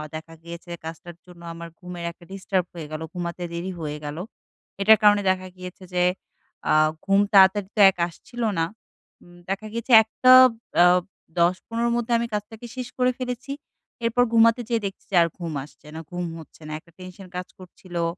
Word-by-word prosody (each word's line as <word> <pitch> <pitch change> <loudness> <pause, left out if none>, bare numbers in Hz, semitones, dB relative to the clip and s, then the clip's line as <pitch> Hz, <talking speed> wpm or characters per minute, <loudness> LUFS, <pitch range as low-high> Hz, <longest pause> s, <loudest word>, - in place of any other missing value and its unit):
দেখা 165 +1 -8
গিয়েছে 170 +1 -9
কাজটার 165 +1 -8
জন্য 175 -1 -15
আমার 170 0 -8
ঘুমের 180 -1 -7
একটা 175 - -20
ডিস্টার্ব 190 -2 -1
হয়ে 160 -3 -7
গেলো, 155 +1 -5
ঘুমাতে 175 0 -4
দেরি 175 +3 -4
হয়ে 150 -1 -4
গেলো। 150 +4 -5 0.6
এটার 220 +2 +7
কারণে 205 0 +6
দেখা 185 0 0
গিয়েছে 185 +1 -10
যে 180 0 +2 0.7
আ - - +5 0.3
ঘুম 195 0 +4
তাড়াতাড়ি 190 0 +6
তো 210 - +3
এক - - -30
আসছিলো 235 +7 -5
না। 165 - +2 0.6
উম 175 0 -17
দেখা 200 +3 -3
গেছে 235 +2 -4
১ 220 - -32
টা 255 0 +9 0.5
অ - - +7 0.5
১০-১৫ 230 +7 +1
'র - - +1
মধ্যে 240 0 -3
আমি 235 0 -2
কাজটাকে 215 +3 -5
শেষ 250 -1 -5
করে 255 0 +3
ফেলেছি। 250 +2 -5 0.5
এরপর 245 +2 +3
ঘুমাতে 230 +1 +5
যেয়ে 230 -3 0
দেখছি 195 - -6
যে - - 0
আর - - +1
ঘুম 165 -3 -4
আসছে 150 +1 -17
না, - - -5
ঘুম 175 0 -3
হচ্ছে 160 - -15
না। - - -7
একটা 170 - -24
টেনশন 185 +1 -11
কাজ 180 - -5
করছিলো। 180 -2 -6
185 Hz, 185 wpm, -24 LUFS, 170-220 Hz, 0.7 s, টা